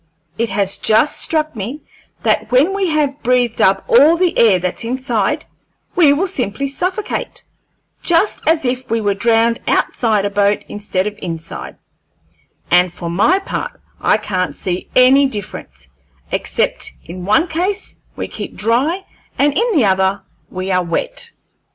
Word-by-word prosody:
It 230 Hz, +3 st, -1 dB
has 195 Hz, 0 st, 0 dB
just 220 Hz, +7 st, +2 dB
struck 310 Hz, -3 st, +1 dB
me 230 Hz, +9 st, -5 dB, 0.4 s
that -, -, +1 dB
when 280 Hz, +10 st, +4 dB
we 395 Hz, -1 st, 0 dB
have 295 Hz, -3 st, 0 dB
breathed 245 Hz, -1 st, +1 dB
up 195 Hz, 0 st, +3 dB
all 295 Hz, +8 st, +6 dB
the 360 Hz, -1 st, +1 dB
air 215 Hz, -5 st, +5 dB
that's 180 Hz, +4 st, -3 dB
inside, 255 Hz, +4 st, -1 dB, 0.5 s
we 315 Hz, -5 st, +6 dB
will 305 Hz, +7 st, +1 dB
simply 275 Hz, -, -3 dB
suffocate, 365 Hz, +9 st, -3 dB, 0.6 s
just 345 Hz, +4 st, +1 dB
as 320 Hz, -3 st, +2 dB
if 250 Hz, +1 st, -2 dB
we 230 Hz, -, +1 dB
were 205 Hz, -2 st, +1 dB
drowned 230 Hz, +3 st, +2 dB
outside 215 Hz, -4 st, +1 dB
a 200 Hz, -, -1 dB
boat 205 Hz, 0 st, +1 dB
instead 205 Hz, -2 st, -2 dB
of 210 Hz, 0 st, -5 dB
inside; 165 Hz, -2 st, -6 dB, 1.0 s
and 180 Hz, 0 st, +4 dB
for 170 Hz, -1 st, -6 dB
my 205 Hz, -, +3 dB
part 390 Hz, -, -5 dB, 0.2 s
I -, -, +3 dB
can't 185 Hz, -4 st, -2 dB
see 180 Hz, -1 st, -4 dB
any 265 Hz, +2 st, +6 dB
difference, 205 Hz, -7 st, -8 dB, 0.4 s
except -, -, -1 dB
in 180 Hz, +2 st, -8 dB
one 215 Hz, -, +3 dB
case 365 Hz, +5 st, -3 dB, 0.2 s
we -, -, -4 dB
keep -, -, -7 dB
dry 275 Hz, -, 0 dB, 0.3 s
and 285 Hz, 0 st, +2 dB
in 470 Hz, +3 st, +2 dB
the 270 Hz, -8 st, +4 dB
other 190 Hz, 0 st, +1 dB, 0.3 s
we 185 Hz, +1 st, -4 dB
are 180 Hz, 0 st, +2 dB
wet." -, -, -2 dB
235 Hz, 150 wpm, -17 LUFS, 200-310 Hz, 1.0 s, all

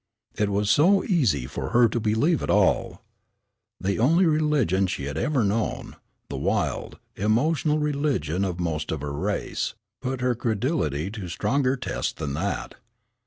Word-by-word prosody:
It 105 Hz, -1 st, 0 dB
was 100 Hz, +1 st, 0 dB
so 185 Hz, -, +5 dB
easy 120 Hz, -, +1 dB
for -, -, -5 dB
her 120 Hz, 0 st, +5 dB
to 120 Hz, -, -1 dB
believe 115 Hz, +10 st, +1 dB
it -, -, -4 dB
all. -, -, +2 dB, 0.8 s
The 100 Hz, +2 st, -1 dB
only 165 Hz, +10 st, +4 dB
religion 150 Hz, -, +2 dB
she 80 Hz, -, -4 dB
had 70 Hz, +1 st, -4 dB
ever 140 Hz, -6 st, +1 dB
known, 105 Hz, +2 st, -1 dB, 0.3 s
the -, -, -5 dB
wild, -, -, -1 dB, 0.2 s
emotional 150 Hz, +9 st, +1 dB
religion 140 Hz, -, 0 dB
of 90 Hz, -2 st, -2 dB
most 80 Hz, -3 st, -2 dB
of 80 Hz, -3 st, -3 dB
her 70 Hz, -1 st, -4 dB
race, 70 Hz, -, -2 dB, 0.3 s
put 130 Hz, -1 st, -3 dB
her 125 Hz, 0 st, +2 dB
credulity 110 Hz, -, -1 dB
to 105 Hz, -4 st, -6 dB
stronger 135 Hz, +8 st, 0 dB
tests -, -, -3 dB
than 70 Hz, -, -4 dB
that. -, -, -3 dB
115 Hz, 155 wpm, -25 LUFS, 90-145 Hz, 0.8 s, so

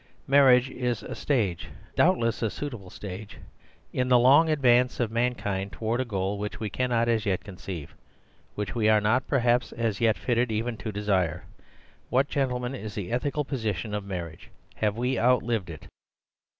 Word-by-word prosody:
Marriage 135 Hz, -2 st, +6 dB
is 125 Hz, -3 st, -2 dB
a -, -, -6 dB
stage—doubtless 115 Hz, -, 0 dB
a 115 Hz, -, +1 dB
suitable 115 Hz, -8 st, -6 dB
stage—in 105 Hz, +6 st, -7 dB
the 125 Hz, -1 st, +6 dB
long 140 Hz, +7 st, +6 dB
advance 125 Hz, -4 st, +3 dB
of 115 Hz, -3 st, 0 dB
mankind 110 Hz, -5 st, -1 dB
towards 115 Hz, +3 st, -1 dB
a -, -, -2 dB
goal 100 Hz, -2 st, -2 dB
which 105 Hz, +1 st, -5 dB
we 110 Hz, -2 st, -4 dB
cannot 120 Hz, -1 st, +1 dB
as 115 Hz, -2 st, +1 dB
yet 95 Hz, -2 st, 0 dB
conceive; 90 Hz, -5 st, -8 dB, 0.6 s
which 105 Hz, -1 st, -3 dB
we 110 Hz, -2 st, +2 dB
are 110 Hz, -1 st, +5 dB
not, 110 Hz, +5 st, +1 dB
perhaps, 125 Hz, -2 st, +2 dB
as 115 Hz, -3 st, -2 dB
yet 110 Hz, -2 st, +3 dB
fitted 120 Hz, -1 st, 0 dB
even 115 Hz, +2 st, -1 dB
to 110 Hz, 0 st, -5 dB
desire. 100 Hz, -6 st, 0 dB, 0.7 s
What, 135 Hz, +3 st, +2 dB
gentlemen, 125 Hz, -2 st, -1 dB
is 110 Hz, -5 st, -7 dB
the 100 Hz, 0 st, -5 dB
ethical 140 Hz, +4 st, -1 dB
position 110 Hz, -, -3 dB
of 105 Hz, -1 st, -2 dB
marriage? 85 Hz, -5 st, -7 dB, 0.3 s
Have 105 Hz, 0 st, 0 dB
we 125 Hz, +2 st, 0 dB
outlived 115 Hz, -5 st, +2 dB
it?" 80 Hz, -2 st, -9 dB
115 Hz, 160 wpm, -27 LUFS, 105-125 Hz, 0.7 s, Marriage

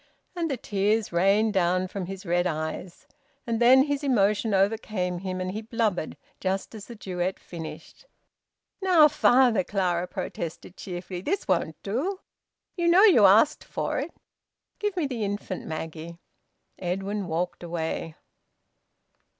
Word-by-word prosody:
And 335 Hz, -2 st, -1 dB
the 270 Hz, -, -1 dB
tears 210 Hz, -1 st, 0 dB
rained 200 Hz, +5 st, +3 dB
down 185 Hz, 0 st, +2 dB
from 185 Hz, -1 st, -5 dB
his 195 Hz, +1 st, -7 dB
red 175 Hz, +1 st, +1 dB
eyes, 160 Hz, +2 st, -5 dB, 0.4 s
and 230 Hz, -2 st, -1 dB
then 260 Hz, +2 st, +7 dB
his 285 Hz, 0 st, -2 dB
emotion 215 Hz, -4 st, +2 dB
overcame 195 Hz, -2 st, 0 dB
him 185 Hz, 0 st, -4 dB
and 185 Hz, 0 st, -2 dB
he 215 Hz, +3 st, -4 dB
blubbered, 220 Hz, -7 st, -1 dB, 0.2 s
just 190 Hz, +3 st, -2 dB
as 215 Hz, -2 st, -9 dB
the 235 Hz, -, -9 dB
duet 185 Hz, -2 st, -3 dB
finished. 170 Hz, -, -10 dB, 0.7 s
"Now, 355 Hz, -5 st, +6 dB
father," 250 Hz, -7 st, +4 dB
Clara 180 Hz, -2 st, -1 dB
protested 170 Hz, +1 st, -6 dB
cheerfully, 180 Hz, -1 st, -6 dB
"this 390 Hz, -, -2 dB
won't 170 Hz, -4 st, 0 dB
do. 290 Hz, -, -2 dB, 0.6 s
You 345 Hz, -2 st, 0 dB
know 355 Hz, +4 st, +6 dB
you 285 Hz, -, +7 dB
asked 220 Hz, +9 st, +4 dB
for -, -, -3 dB
it. -, -, -3 dB, 0.7 s
Give 415 Hz, -3 st, -2 dB
me 335 Hz, -, +1 dB
the 250 Hz, -5 st, -3 dB
infant, 200 Hz, -2 st, -4 dB
Maggie." 160 Hz, +1 st, -6 dB, 0.6 s
Edwin 195 Hz, +2 st, -3 dB
walked 175 Hz, +2 st, -2 dB
away. 165 Hz, -2 st, -4 dB
195 Hz, 140 wpm, -26 LUFS, 180-235 Hz, 0.7 s, then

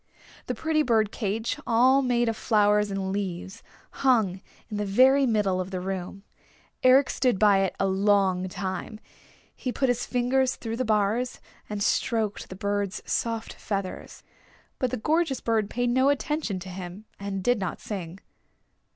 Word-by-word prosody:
The -, -, -2 dB
pretty 320 Hz, -1 st, +1 dB
bird 220 Hz, -6 st, +2 dB
cage, 220 Hz, +5 st, -2 dB
all 255 Hz, +3 st, +5 dB
made 240 Hz, -2 st, +1 dB
of 225 Hz, -, 0 dB
flowers 210 Hz, -2 st, +2 dB
and 195 Hz, -1 st, -2 dB
leaves, 195 Hz, +1 st, -4 dB, 0.3 s
hung 220 Hz, -8 st, +2 dB, 0.3 s
in 210 Hz, -, -5 dB
the 210 Hz, -, -1 dB
very 260 Hz, +7 st, +4 dB
middle 200 Hz, -5 st, +1 dB
of 185 Hz, -, -5 dB
the 185 Hz, -1 st, -3 dB
room. 190 Hz, +1 st, -5 dB, 0.6 s
Eric 260 Hz, +2 st, +6 dB
stood 250 Hz, -6 st, +1 dB
by 205 Hz, -1 st, +5 dB
it 195 Hz, -1 st, 0 dB
a -, -, +2 dB
long 190 Hz, -1 st, +2 dB
time. 190 Hz, +3 st, -5 dB, 0.6 s
He 255 Hz, -, -3 dB
put 265 Hz, +1 st, 0 dB
his 245 Hz, -1 st, 0 dB
fingers 255 Hz, +1 st, +1 dB
through 225 Hz, -1 st, -5 dB
the 255 Hz, -, 0 dB
bars, 215 Hz, +3 st, 0 dB, 0.3 s
and 210 Hz, -1 st, -2 dB
stroked 220 Hz, -2 st, 0 dB
the 185 Hz, -, -7 dB
bird's 200 Hz, 0 st, -2 dB
soft 230 Hz, -1 st, -2 dB
feathers. 195 Hz, -3 st, -5 dB, 0.6 s
But 255 Hz, -, +1 dB
the -, -, -3 dB
gorgeous 305 Hz, +3 st, +1 dB
bird 220 Hz, -3 st, 0 dB
paid 245 Hz, 0 st, 0 dB
no 260 Hz, +3 st, +3 dB
attention 285 Hz, -6 st, -1 dB
to 190 Hz, -, -8 dB
him, 185 Hz, +3 st, -8 dB
and 195 Hz, -1 st, -4 dB
did 245 Hz, 0 st, +2 dB
not 185 Hz, -3 st, -3 dB
sing. 185 Hz, -3 st, -6 dB
215 Hz, 160 wpm, -26 LUFS, 195-245 Hz, 0.6 s, Eric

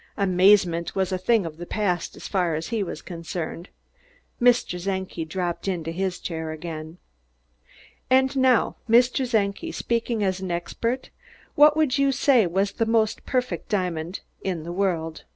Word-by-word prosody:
Amazement 185 Hz, -3 st, +3 dB
was 190 Hz, -1 st, 0 dB
a 185 Hz, -, 0 dB
thing 215 Hz, +1 st, +2 dB
of 160 Hz, -2 st, -7 dB
the 175 Hz, -, -7 dB
past, 185 Hz, -5 st, -1 dB
as -, -, -7 dB
far 180 Hz, -5 st, 0 dB
as 160 Hz, +1 st, -4 dB
he 225 Hz, -2 st, -1 dB
was 175 Hz, -5 st, -5 dB
concerned. 170 Hz, 0 st, -6 dB, 0.7 s
Mr. 240 Hz, -8 st, +3 dB
Czenki 190 Hz, -4 st, -3 dB
dropped 175 Hz, +2 st, -3 dB
into 170 Hz, -4 st, -2 dB
his 185 Hz, +1 st, -2 dB
chair 160 Hz, -2 st, -4 dB
again. 160 Hz, 0 st, -7 dB, 1.1 s
"And 265 Hz, +1 st, +3 dB
now, 260 Hz, -3 st, +3 dB
Mr. 245 Hz, +2 st, +4 dB
Czenki, 215 Hz, +8 st, 0 dB
speaking 230 Hz, -4 st, -1 dB
as 190 Hz, -1 st, 0 dB
an 190 Hz, -1 st, -5 dB
expert, 230 Hz, +9 st, -3 dB, 0.4 s
what 300 Hz, +1 st, +6 dB
would 295 Hz, -3 st, +2 dB
you 275 Hz, 0 st, +3 dB
say 250 Hz, -5 st, +4 dB
was 195 Hz, +3 st, 0 dB
the 225 Hz, -, -1 dB
most 220 Hz, -1 st, +1 dB
perfect 250 Hz, -1 st, -2 dB
diamond 180 Hz, -3 st, -2 dB, 0.2 s
the 170 Hz, -3 st, -3 dB
world?" 175 Hz, -4 st, -1 dB
190 Hz, 150 wpm, -24 LUFS, 170-230 Hz, 1.1 s, what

